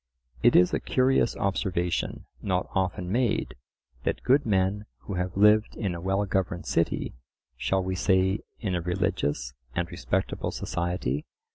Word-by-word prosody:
It - - +5
is 90 - +6
a - - +2
curious 130 -2 +2
observation, 90 -3 -1 0.2
not - - 0
often 90 -1 -1
made, 120 - +1 0.5
that - - -1
good 135 +1 +3
men 100 +1 +1
who 100 - -6
have 90 +1 -2
lived 105 +1 +5
in 100 -5 -2
a 85 - -6
well 95 +3 +1
governed 95 -2 -1
city - - 0 0.4
(shall 95 +9 0
we 95 0 -2
say 95 +1 +2 0.2
in 100 -5 -2
a 90 - 0
religious 75 -6 -1 0.2
and 85 -1 -1
respectable - - -1
society?) 85 -6 -2
95 Hz, 145 wpm, -27 LUFS, 90-100 Hz, 0.5 s, is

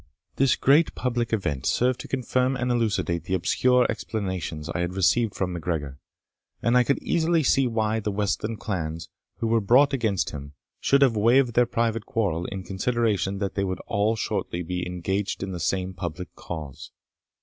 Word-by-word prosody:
This 135 -2 +4
great 150 +5 +3
public 120 -2 -1
event 75 - -1
served 125 0 +1
to - - -7
confirm 130 0 0
and 125 -1 -1
elucidate 105 -8 0
the 95 - 0
obscure 125 +7 +3
explanations 95 -7 -4
I 85 - -3
had 90 +1 -2
received 95 +5 +2
from 90 -2 -2
MacGregor; 75 -5 -3 0.6
and 115 +1 +1
I 125 - +6
could 140 +3 +1
easily 165 -1 +2
see 135 0 +3
why 110 -1 0
the 105 - -2
westland 105 +2 -2
clans, 85 -5 -4 0.3
who - - 0
were 115 0 +2
brought 135 +7 +4
against 110 -7 0
him, 70 0 -8 0.3
should 140 0 +4
have 125 -4 +3
waived 120 +3 +4
their 120 +1 +4
private 115 -2 -1
quarrel, 90 -6 -1
in 95 -1 -5
consideration 100 -1 0
that 100 -1 -2
they 100 - -1
were 95 -1 -2
all 105 +3 +1
shortly 90 -4 -2
to - - -13
be 90 0 -2
engaged 95 +3 -2
in 95 - -4
the 90 - -5
same 95 +3 -1
public 90 0 -6
cause. 75 -6 -8
105 Hz, 180 wpm, -25 LUFS, 90-120 Hz, 0.6 s, I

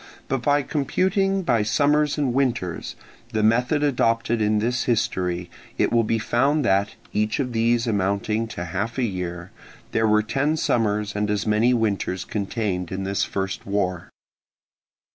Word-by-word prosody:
But 135 -2 -1
by 145 +2 +2
computing 190 +7 0
by 120 -9 +2
summers 145 +7 +2
and 140 -5 0
winters, 120 -10 -1 0.4
the 110 -1 +1
method 125 +7 +2
adopted 115 -4 +1
in 105 0 +2
this 120 +3 0
history, 90 -6 0 0.3
it - - +1
will 115 -1 +4
be 115 +1 0
found 135 +6 +1
that, 100 -1 +1 0.2
each 105 +3 0
of 125 -3 -2
these 115 +1 +2
amounting 105 +1 0
to 90 -5 -6
half 95 +8 -3
a 130 - +1
year, 90 -4 -4 0.4
there 110 0 +2
were 105 0 +3
ten 145 +7 0
summers 105 -6 0
and 105 0 0
as 105 -1 0
many 110 +3 +3
winters 100 -5 -1
contained 100 -4 -2
in 95 +1 -3
this 100 +1 0
first 95 0 -3
war. 90 -3 -1
110 Hz, 155 wpm, -23 LUFS, 100-125 Hz, 0.4 s, will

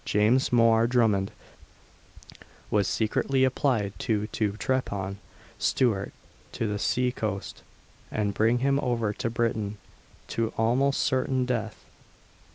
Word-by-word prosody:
James 110 +6 +2
Mhor 115 -1 +4
Drummond 110 -6 +2 1.4
was 100 -2 +2
secretly 130 +4 +1
applied 125 -6 +1
to 105 -2 0
to 105 -1 -1
trepan 100 -5 -2 0.4
Stewart 110 -7 +1 0.4
to - - -2
the 105 -1 -2
sea 125 +3 +1
coast, 105 -5 -4 0.5
and 105 -2 -1
bring 115 +4 +2
him 140 0 +3
over 115 -5 0
to 115 - -3
Britain, 110 -3 -1 0.5
to 115 -1 -1
almost 130 +5 +2
certain 130 0 +1
death. 115 -3 -3
115 Hz, 115 wpm, -27 LUFS, 105-125 Hz, 1.4 s, Mhor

